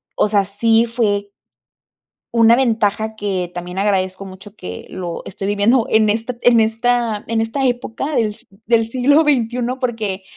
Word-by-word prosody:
o - - +2
sea, 200 -2 +2
sí 225 +3 +2
fue. 205 -4 -1 1.0
Una 230 0 +6
ventaja 220 -3 0
que 190 -4 -3
también 180 +1 -5
agradezco 190 -1 0
mucho 195 +2 -12
que 90 - -8
lo 175 -2 -6
estoy 195 +1 -6
viviendo 210 +4 +2
en 220 -1 +3
esta 230 +3 -3
en 240 -1 +5
esta, 225 -1 0
en 225 0 0
esta 245 +5 -1
época 250 +3 -2
del 215 -2 0
si - - -20 0.2
del 225 -1 +3
siglo 275 +5 +4
XXI, 250 -5 +1 0.2
porque 220 -6 -3
220 Hz, 155 wpm, -18 LUFS, 200-235 Hz, 1.0 s, Una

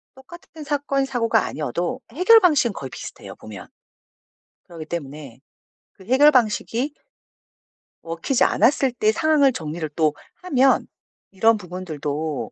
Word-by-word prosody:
똑같은 320 +4 -13
사건 280 -2 -1
사고가 230 -5 0
아니어도 175 - -4
해결 370 - +6
방식은 290 - +3
거의 135 -6 -7
비슷해요, - - -10
보면. 105 -4 -11 1.0
그러기 165 -3 -9
때문에 145 -6 -8 0.5
그 190 - -18
해결 265 +7 +5
방식이 245 +2 0 1.1
먹히지 165 +10 -1
않았을 270 0 +2
때 215 -3 +2
상황을 290 0 +3
정리를 160 -2 -5
또 155 -2 +2 0.3
하면 270 -6 +2 0.5
이런 225 +4 +3
부분들도 160 -5 -5
225 Hz, 285 characters per minute, -22 LUFS, -, 1.1 s, 해결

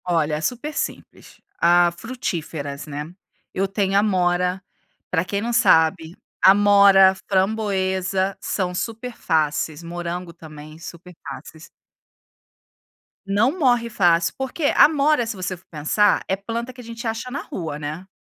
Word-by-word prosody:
Olha, 165 -4 0
é 150 - -4
super 250 - -3
simples - - -6 0.2
a 175 0 +4
frutíferas, 165 - -5
né. 150 +3 -6 0.4
Eu 195 +1 0
tenho 195 0 0
amora, 180 -2 +1 0.5
pra 165 -2 +1
quem 200 +2 -3
não 235 +2 -2
sabe, 165 -6 +3 0.3
amora, 200 -1 +6 0.2
framboesa, 190 -1 0
são 180 -3 -2
super 230 +5 -5
fáceis, 155 0 -1
morango 175 +1 -5
também 155 -1 -12
super 170 +2 -11
fáceis. 160 0 -10 1.6
Não 215 - +1
morre 245 -5 +2
fácil, 170 -5 +2
porque 265 +4 -4
amora 295 -4 +4
se 225 - -4
você 185 0 -4
for 180 - -21
pensar 165 +7 +1
é 190 - +1
planta 230 +5 -5
que 250 - -11
a - - -13
gente 230 +1 -9
acha 225 +3 -3
na 275 +3 -4
rua, 160 -5 -6
né. 155 +5 -6
190 Hz, 135 wpm, -22 LUFS, 170-225 Hz, 1.6 s, amora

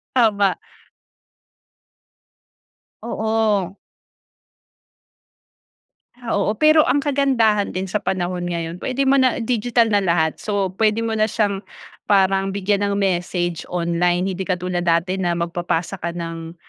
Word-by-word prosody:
Tama. 205 -6 +3 2.5
Oo. 220 -4 0 2.5
Ah, 230 - -4
oo. 210 +2 0
Pero 310 +5 +5
ang 285 - +2
kagandahan 255 -9 +1
din 185 0 -3
sa 210 - 0
panahon 180 -2 -2
ngayon, 170 0 -4
puwede 265 +6 -1
mo 275 0 +4
na 255 -2 +2
digital 235 0 +1
na 205 - +4
lahat. 170 -4 0
So, 200 -3 -1
puwede 220 +1 +2
mo 225 - -2
na 215 0 +1
siyang 205 -3 0 0.5
parang 195 -1 +2
bigyan 200 +1 0
ng 200 - -1
message 175 -3 -1
online. 175 +1 0
Hindi 190 0 -4
katulad 180 -1 -2
dati 170 +3 +1
na 175 -2 0
magpapasa 170 +1 -2
ka 170 +1 -4
ng 165 -1 -6
195 Hz, 120 wpm, -21 LUFS, 175-220 Hz, 2.5 s, Pero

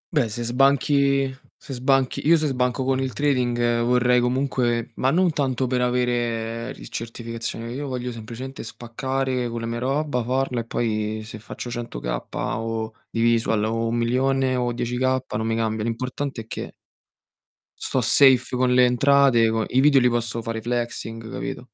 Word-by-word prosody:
Beh, 125 -7 +2
se 120 +3 -4
sbanchi 135 +1 +2 0.2
se 135 - -9
sbanchi 135 +2 +1
io 170 0 +7
se 155 - -1
sbanco 125 -1 0
con 130 0 +1
il 130 -2 -2
trading 120 -4 +1
vorrei 125 0 +3
comunque 125 -2 0
ma 130 - +2
non 175 +2 +3
tanto 135 -3 0
per 125 0 0
avere 120 -2 -1
il - - -10
certificazione. 115 0 -5
Io 140 +2 -4
voglio 125 -1 -3
semplicemente 120 +4 -7
spaccare 125 +2 -3
con 115 0 -4
le 115 - -3
mie 115 0 -3
roba, 135 -1 0
farla 130 0 0
e 115 - -4
poi 110 -2 -2
se 110 0 -9
faccio 120 +2 -7
100 120 - -5
kappa - - -3
o 115 -1 -3 0.2
di 115 - -2
visual 115 -2 +2
o 115 +1 0
1.000.000 130 +3 +1
o 120 -1 0
10 120 +1 -3
kappa, 130 -2 0
non 110 - -2
mi 115 - 0
cambia. 110 -1 -1
L'importante 125 +2 -3
è - - -12
che - - -6 1.1
sto - - 0
safe 130 -3 +4
con 125 0 +2
le 125 0 +6
entrate, 125 -2 +4
co 110 0 0
i 130 - +1
video 140 -2 +6
li 125 0 +4
posso 115 -1 -2
fare 115 0 -4
flexing, 115 -1 -4
capito? 125 - -5
125 Hz, 170 wpm, -23 LUFS, 115-130 Hz, 1.1 s, io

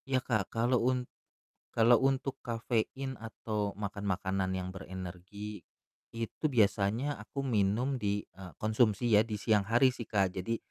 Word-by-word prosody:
Iya 130 - +3
Kak, 110 -5 0
kalau 120 +2 +2
un 125 -1 0 0.7
kalau 115 +1 +5
untuk 135 0 +1
kafein 120 +3 -2
atau 105 -2 -3
makan 100 -1 -4
makanan 95 0 0
yang 95 0 -2
berenergi, 95 +3 -7 0.5
itu 115 +6 -5
biasanya 110 +4 +2
aku 140 -1 -5
minum 115 +4 +2
di, 100 0 0
e 95 - -13 0.2
konsumsi 110 +1 +2
ya 105 - +7
di 110 -1 -4
siang 110 -1 +3
hari 120 +6 +4
sih 120 - -5
Kak, 100 -2 +1
jadi 105 +5 -1
110 Hz, 145 wpm, -32 LUFS, 100-120 Hz, 0.7 s, ya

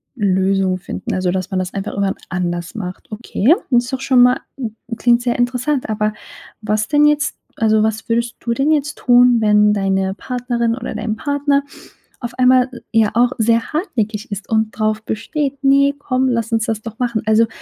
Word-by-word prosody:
Lösung 190 -3 +1
finden, 185 0 -6
also, 185 -1 0
dass 185 0 -3
man 190 - -1
das 185 0 -4
einfach 195 0 -4
irgendwann 200 -1 -1
anders 175 0 -3
macht, 185 -2 -7
okay? 230 +4 +2 0.2
Und 245 - +5
ist 245 - -8
doch 265 - -2
schon 260 -2 +4
mal 250 +1 +5 0.6
klingt 240 0 +3
sehr 240 -1 -1
interessant, 250 +2 0
aber 215 0 0 0.5
was 215 0 -1
denn 295 0 +4
jetzt 295 0 +2 0.2
also, 220 -1 +2
was 220 0 -2
würdest 235 0 -1
du 235 - -2
denn 275 +5 +1
jetzt 295 -1 0
tun, 245 -1 +5
wenn 210 -1 +4
deine 195 -1 0
Partnerin 240 0 -2
oder 245 -2 -6
dein 215 0 -2
Partner 285 +1 +1 0.6
auf 240 -1 -6
einmal, 255 0 +4 0.2
ja, 225 -2 +3
auch 240 +2 +3
sehr 230 +1 +1
hartnäckig 225 - -2
ist 200 0 -6
und 220 -1 +1
drauf 215 0 0
besteht: 275 +6 -3
„Ne, 280 +1 +4
komm, 260 -2 0
lass 230 -1 -1
uns 225 -1 +1
das 220 -1 -2
doch 225 -1 -8
machen.“ 235 -3 -1
Also, 220 +1 +4
230 Hz, 185 wpm, -18 LUFS, 210-255 Hz, 0.6 s, Und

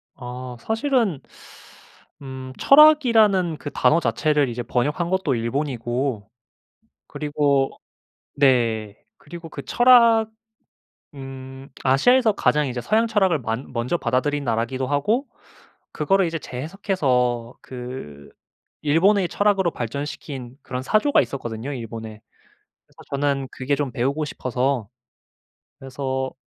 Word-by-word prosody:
아 125 -1 -8
사실은 225 - 0 1.0
음 130 -1 -8
철학이라는 230 - +5
그 145 - -6
단어 165 - +3
자체를 145 +2 +1
이제 120 +1 -4
번역한 145 +9 -1
것도 190 -8 0
일본이고 120 -2 -2 0.8
그리고 145 -2 0 0.7
네 115 -6 +2 0.2
그리고 165 +1 -10
그 140 - -8
철학 230 - +5 0.9
음 135 0 -9 0.2
아시아에서 220 - +4
가장 150 -6 +1
이제 125 -1 -4
서양철학을 210 - +2
만 115 +3 -4
먼저 125 +7 -1
받아들인 140 +3 -1
나라기도 120 +3 -1
하고 210 - 0 0.7
그거를 195 -1 +2
이제 165 0 -3
재해석해서 130 - -1
그 125 - -9 0.5
일본의 180 +6 +3
철학으로 195 -3 +1
발전시킨 130 0 -6
그런 125 0 -5
사조가 215 - +3
있었거든요, 120 0 -5
일본에. 115 -3 -7 0.7
그래서 - - -21
저는 140 -1 -1
그게 135 +2 -1
좀 140 -3 -3
배우고 140 +6 -1
싶어서 130 -4 -2 0.9
그래서, 130 0 -4
140 Hz, 265 characters per minute, -22 LUFS, 125-175 Hz, 1.0 s, 철학이라는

